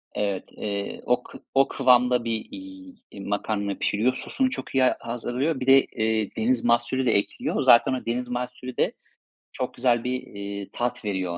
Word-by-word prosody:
Evet, 100 -2 -2
eee, 100 -1 -4
o - - +2
kı - - -12 0.2
o 135 0 +5
kıvamda 125 -1 +3
bir, 115 -1 -2
iii, 285 -1 -10 0.3
makarna 100 0 -2
pişiriyor, 115 +5 +1
sosunu 260 - -1
çok 255 - -5
iyi 130 - +4
a 130 - +3
hazırlıyor. 125 +5 -2
Bir 130 - -4
de, 135 0 +8
eee, 110 -1 -1
deniz 120 +2 +1
mahsulü 120 +2 +2
de 120 - +3
ekliyor. 100 - 0
Zaten 130 +3 +6
o 130 - -4
deniz 125 +2 -2
mahsulü 125 +1 -5
de - - +2 0.6
çok - - -4
güzel 120 -2 +2
bir, 125 +1 -2
eee, 100 0 -7
tat 120 -2 -2
veriyor 95 -4 -2
120 Hz, 175 wpm, -25 LUFS, 105-130 Hz, 0.6 s, de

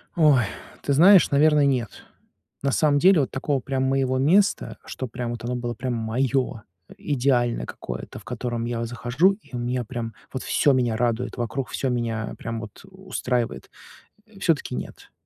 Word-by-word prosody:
Ой, 150 -7 +5 0.4
ты 140 - 0
знаешь, 180 +6 +7
наверное, 150 0 +4
нет. 125 -6 -1 0.6
На 140 - +1
самом 145 +1 +3
деле 180 0 +6
вот 135 - -2
такого 135 +1 -1
прям 130 0 -2
моего 130 -1 +1
места, 185 +10 +2
что 130 - -5
прям 120 0 -4
вот 120 -1 -6
оно 125 +1 -2
было 120 -1 -3
прям 125 +2 -3
моё, 125 +2 -1 0.4
идеальное 125 -4 +1
какое-то, - - -7
в - - -17
котором 120 0 -3
я 120 -1 -2
захожу, 125 +10 +2
и 195 - -12
у - - -2
меня 125 +1 -1
прям 115 0 -5 0.2
вот, 130 - -4
всё 145 - +3
меня 120 -3 +1
радует 120 +2 -1
вокруг, 125 +2 -3
всё 135 - -2
меня, 115 -3 -2
прям 115 -1 -5
вот, 105 -3 -10
устраивает. 125 - -3 0.6
Э, 220 -2 -18
все-таки 160 -8 0
нет. - - -8
125 Hz, 170 wpm, -24 LUFS, 120-140 Hz, 0.6 s, знаешь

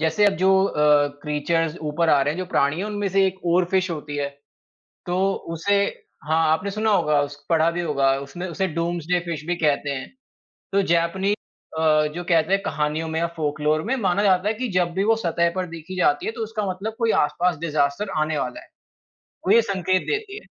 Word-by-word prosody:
जैसे 160 +6 +2
अब 200 - +4
जो 190 +2 +3 0.2
अ, 150 -3 +3
क्रीचर्स 155 +2 -1
ऊपर 165 +2 0
आ 145 -3 +5
रहे 145 - +1
हैं, - - -7
जो 185 - -3
प्राणी 140 -2 +2
हैं 190 - -2
उनमें 205 -1 -2
से 195 +1 +3
एक 190 0 -5
ओरफ़िश 180 +2 +2
होती 150 -2 -5
है। 140 -1 -1 0.8
तो 175 0 -1 0.4
उसे 200 +5 +1 0.4
हाँ, 160 +1 +2
आपने 185 +6 -1
सुना 215 +2 0
होगा, 150 -7 +3
उस 145 0 -7
पढ़ा 165 0 +3
भी 170 +1 -3
होगा। 140 -5 +2
उसने 175 +6 -6
उसे 190 +3 -1
डूम्सडे 170 +1 0
फ़िश 165 -3 -4
भी 175 +1 -1
कहते 145 -3 +1
हैं। 130 -2 -4 0.7
तो 200 - +4
जैपनी 170 +4 +1 0.5
अ, 155 -1 +3
जो 175 - -4
कहते 165 +1 +3
हैं 195 - +2
कहानियों 150 0 -1
में 160 0 -2
या 170 - +1
फ़ोकलोर 155 0 0
में 265 - +2
माना 200 -4 +1
जाता 190 0 +3
है 215 - +2
कि 250 +3 -3
जब 180 -2 +2
भी 190 +2 0
वो 225 +2 +3
सतह 170 -5 +1
पर 185 -1 -1
देखी 165 +2 -8
जाती 145 -5 +2
है - - -1
तो 230 - -7
उसका 215 -1 -3
मतलब 200 +4 -4
कोई 230 -2 +2
आस-पास 180 +2 -1
डिज़ास्टर 155 +4 0
आने 155 0 0
वाला 125 -2 -4
है। - - -17 0.8
वो - - +4
ये 230 - +7
संकेत 185 -3 0
देती 420 -1 -3
है। - - -20
170 Hz, 210 wpm, -23 LUFS, 155-195 Hz, 0.8 s, ये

